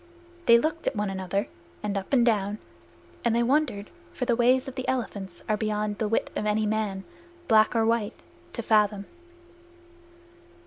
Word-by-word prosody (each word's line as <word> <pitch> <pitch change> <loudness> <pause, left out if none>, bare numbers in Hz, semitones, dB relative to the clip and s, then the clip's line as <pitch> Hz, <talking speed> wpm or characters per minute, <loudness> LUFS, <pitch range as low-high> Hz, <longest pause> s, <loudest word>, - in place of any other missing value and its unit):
They 235 - +8
looked 315 +6 -2
at - - 0
one 205 -1 -1
another 190 +1 -2 0.4
and 205 -1 -2
up 195 -1 -4
and 250 -4 +4
down, 210 -3 +1 0.7
and 235 -1 +2
they 235 - +3
wondered. 245 -6 0 0.2
For 250 - -3
the 240 - +2
ways 250 +2 +3
of 265 - -6
elephants 200 -8 -3
are 215 - +2
beyond 210 -1 -2
the 220 - 0
wit 225 - 0
of 210 - -1
any 215 +1 +1
man, 210 -3 -1 0.4
black 220 0 +4
or 225 -1 +3
white, 230 -1 0 0.3
to 235 - -4
fathom. 210 -2 +2
215 Hz, 165 wpm, -26 LUFS, 205-235 Hz, 0.7 s, They